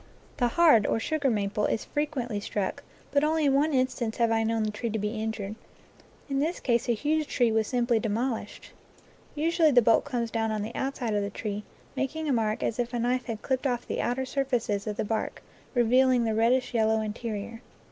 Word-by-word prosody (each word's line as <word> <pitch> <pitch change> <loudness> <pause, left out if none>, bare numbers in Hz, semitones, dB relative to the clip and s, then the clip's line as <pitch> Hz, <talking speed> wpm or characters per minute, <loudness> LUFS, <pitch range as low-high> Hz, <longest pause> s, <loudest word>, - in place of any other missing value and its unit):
The 245 - +2
hard, 265 -6 +5
or - - +1
sugar, 290 +3 0
maple, 210 -2 0
is 220 - -2
frequently 270 -8 -2
struck, 205 -1 -3 0.3
but 285 +1 +3
only 310 0 +2
in 275 - +4
one 295 +3 +3
instance 255 -4 0
have 230 -1 +2
I 225 0 +2
known 225 0 0
the 215 - -1
tree 230 +3 -3
to 220 - -2
be 215 +1 -2
injured. 215 -2 -3 0.7
In 275 -1 -1
this 320 +5 -1
case 235 -2 0
a 235 - +3
huge 305 +5 0
tree 245 -5 +2
was 220 -1 +1
simply 240 -2 +1
demolished. 225 +3 -3 0.6
Usually 325 +1 +3
the 250 -4 +5
bolt 225 0 +4
comes 240 -5 -3
down 225 -1 0
on 215 -1 -2
the 225 +3 -6
outside 260 -4 -2
of 205 - +1
the 200 - -2
tree, 205 0 -5 0.3
making 290 +4 -2
a 280 - +2
mark 220 -2 0
as 230 - -1
if 245 0 -1
a - - -1
knife 250 +2 0
had 225 -3 -5
clipped 260 +1 0
off 245 -2 -2
the - - -2
outer 260 +2 -1
surfaces 245 -6 -1
of 210 -1 -3
the - - -1
bark, 220 +1 -3 0.3
revealing 250 +1 +4
the 225 -1 0
reddish 240 +4 +2
yellow 220 -1 +2
interior. 220 +1 -5
235 Hz, 210 wpm, -27 LUFS, 220-265 Hz, 0.7 s, hard